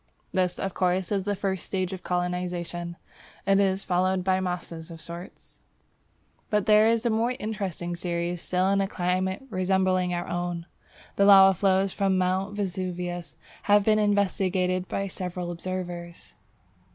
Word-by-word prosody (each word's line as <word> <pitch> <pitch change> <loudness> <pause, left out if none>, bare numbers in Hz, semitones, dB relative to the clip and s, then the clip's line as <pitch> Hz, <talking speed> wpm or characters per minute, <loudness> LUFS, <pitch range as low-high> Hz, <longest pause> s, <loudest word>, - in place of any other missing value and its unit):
This, 180 -1 0
of 195 -2 -3
course, 185 0 0
is 195 -2 0
the 205 0 0
first 190 -1 -2
stage 185 -1 -2
of 185 - -6
colonization. 175 -1 -3 0.5
It 195 0 +4
is 195 -1 +2
followed 185 +1 +1
by 185 0 +2
mosses 175 -3 -4
of 165 -1 -9
sorts. 170 +3 -9 0.9
But 210 -3 +1
there 215 0 +6
is 230 0 +1
a 235 - +3
more 230 +3 +1
interesting 195 -6 -4
series 170 0 -2
still 185 +1 0
in 200 0 +3
a 195 - 0
climate 185 +3 -1
resembling 185 -1 +1
our 175 0 -2
own. 175 -1 -3 0.5
The 200 - +5
lava 195 -1 +8
flows 190 +1 +2
from 195 -2 +1
Mount 190 +2 0
Vesuvius 180 -3 -4 0.3
have 205 0 +6
been 215 +1 +3
investigated 185 -3 +1
by 195 - -2
several 180 -2 -4
observers. 175 -1 -6
185 Hz, 150 wpm, -26 LUFS, 175-195 Hz, 0.9 s, lava